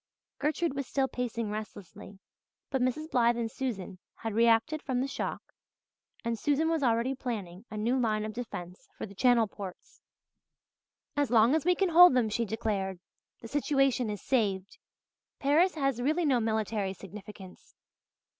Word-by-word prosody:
Gertrude 305 Hz, +2 st, 0 dB
was 275 Hz, -2 st, -4 dB
still 270 Hz, -1 st, +1 dB
pacing 235 Hz, -4 st, -3 dB
restlessly 205 Hz, -2 st, -8 dB, 0.5 s
but 265 Hz, -, 0 dB
Mrs. 305 Hz, +6 st, -1 dB
Blythe 235 Hz, -1 st, +3 dB
and 230 Hz, -1 st, -2 dB
Susan 195 Hz, -8 st, -4 dB, 0.2 s
had 225 Hz, -2 st, -5 dB
reacted 230 Hz, +7 st, +3 dB
from 260 Hz, -4 st, -1 dB
the 265 Hz, -, 0 dB
shock, 275 Hz, -, -5 dB, 0.7 s
and 230 Hz, -1 st, -1 dB
Susan 295 Hz, +2 st, +1 dB
was 325 Hz, -2 st, 0 dB
already 240 Hz, 0 st, +2 dB
planning 210 Hz, -7 st, -5 dB
a 215 Hz, -, -7 dB
new 235 Hz, +5 st, +1 dB
line 215 Hz, -3 st, 0 dB
of 215 Hz, -, -5 dB
defence 190 Hz, -2 st, -7 dB
for -, -, -4 dB
the 200 Hz, -, -12 dB
channel 240 Hz, +2 st, +4 dB
ports. 200 Hz, -3 st, -10 dB, 1.1 s
"As 290 Hz, -2 st, +1 dB
long 230 Hz, +2 st, +5 dB
as 315 Hz, -1 st, +1 dB
we 360 Hz, 0 st, +4 dB
can 385 Hz, +1 st, +1 dB
hold 345 Hz, -3 st, +8 dB
them," 235 Hz, -3 st, +2 dB
she 230 Hz, +2 st, -1 dB
declared, 200 Hz, -4 st, -2 dB, 0.4 s
"the 230 Hz, -, -8 dB
situation 275 Hz, -2 st, +1 dB
is 205 Hz, -1 st, -5 dB
saved. 200 Hz, -7 st, 0 dB, 0.6 s
Paris 320 Hz, +7 st, +3 dB
has 275 Hz, -5 st, 0 dB
really 310 Hz, +6 st, +1 dB
no 265 Hz, -4 st, +3 dB
military 220 Hz, -3 st, -1 dB
significance." 195 Hz, 0 st, -12 dB
235 Hz, 155 wpm, -30 LUFS, 215-275 Hz, 1.1 s, hold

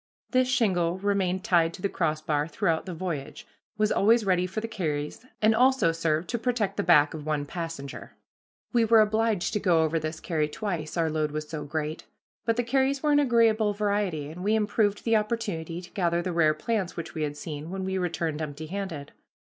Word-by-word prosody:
This 255 Hz, -1 st, +3 dB
shingle 185 Hz, -9 st, +2 dB
remained 190 Hz, -2 st, 0 dB
tied 170 Hz, -5 st, +2 dB
to 185 Hz, -, -12 dB
the -, -, +3 dB
crossbar 155 Hz, -4 st, -1 dB
throughout 165 Hz, -1 st, -1 dB
the 180 Hz, -, -4 dB
voyage, 160 Hz, -5 st, -5 dB, 0.3 s
was 215 Hz, 0 st, +2 dB
always 225 Hz, +2 st, +4 dB
ready 180 Hz, -1 st, +2 dB
for 190 Hz, +4 st, -4 dB
the 225 Hz, -, -4 dB
carries, 155 Hz, -5 st, -3 dB, 0.2 s
and 220 Hz, +1 st, +6 dB
also 255 Hz, -6 st, +4 dB
served 165 Hz, 0 st, -1 dB
to 235 Hz, -, -1 dB
protect 225 Hz, -5 st, 0 dB
the -, -, +2 dB
back 155 Hz, -6 st, +5 dB
of 155 Hz, -2 st, -6 dB
one 150 Hz, -1 st, -1 dB
passenger. 165 Hz, -3 st, -6 dB, 0.6 s
We 235 Hz, -1 st, +4 dB
were 225 Hz, 0 st, +6 dB
obliged 215 Hz, -3 st, +1 dB
to 210 Hz, -, +1 dB
go 175 Hz, -5 st, +3 dB
over 160 Hz, +1 st, +1 dB
this 155 Hz, 0 st, -4 dB
carry 155 Hz, -4 st, -1 dB
twice, 170 Hz, -3 st, -4 dB
our 165 Hz, -1 st, +1 dB
load 155 Hz, -1 st, 0 dB
was 155 Hz, 0 st, -4 dB
so 150 Hz, -2 st, -5 dB
great. 155 Hz, +1 st, -4 dB, 0.4 s
But 230 Hz, -, +2 dB
the 245 Hz, -, 0 dB
carries 270 Hz, +3 st, +1 dB
were 300 Hz, -, +3 dB
an 290 Hz, -, +5 dB
agreeable 230 Hz, -5 st, +3 dB
variety, 200 Hz, -8 st, -1 dB
and 180 Hz, +3 st, -8 dB
we 210 Hz, +2 st, +2 dB
improved 210 Hz, -1 st, +1 dB
the 225 Hz, -1 st, +3 dB
opportunity 205 Hz, -7 st, -3 dB
to 175 Hz, -, -13 dB
gather 175 Hz, -2 st, 0 dB
the 180 Hz, -1 st, -2 dB
rare 155 Hz, -2 st, +3 dB
plants 195 Hz, +2 st, -2 dB
which 170 Hz, 0 st, -5 dB
we 160 Hz, -, -4 dB
had 145 Hz, -1 st, -2 dB
seen, 150 Hz, +1 st, -6 dB
when 190 Hz, +1 st, -4 dB
we 190 Hz, 0 st, -1 dB
returned 165 Hz, -3 st, -2 dB
empty 155 Hz, 0 st, -5 dB
handed. 170 Hz, -5 st, -5 dB
180 Hz, 200 wpm, -27 LUFS, 155-215 Hz, 0.6 s, and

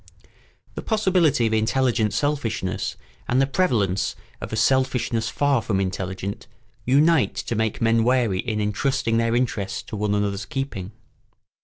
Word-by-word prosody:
] -, -, -34 dB
The -, -, -5 dB
possibility 185 Hz, -, +2 dB
of 110 Hz, -, 0 dB
intelligent 110 Hz, 0 st, +1 dB
selfishness 120 Hz, -10 st, -2 dB, 0.3 s
and 125 Hz, -, +2 dB
the 135 Hz, -, +4 dB
prevalence 120 Hz, -, 0 dB, 0.3 s
of -, -, -6 dB
a -, -, -2 dB
selfishness 125 Hz, -4 st, +1 dB
far 140 Hz, +2 st, +1 dB
from 110 Hz, -3 st, -1 dB
intelligent 95 Hz, +1 st, -4 dB, 0.4 s
unite 145 Hz, +4 st, +3 dB
to -, -, -3 dB
make 110 Hz, -1 st, -1 dB
men 115 Hz, 0 st, +3 dB
wary 120 Hz, -6 st, +2 dB
in 110 Hz, -1 st, -2 dB
intrusting 115 Hz, +2 st, 0 dB
their 115 Hz, 0 st, +1 dB
interests 100 Hz, -5 st, -1 dB
to 105 Hz, -, -8 dB
one 105 Hz, 0 st, 0 dB
another's 100 Hz, 0 st, -1 dB
keeping. 105 Hz, -7 st, -4 dB
115 Hz, 145 wpm, -23 LUFS, 105-130 Hz, 0.4 s, the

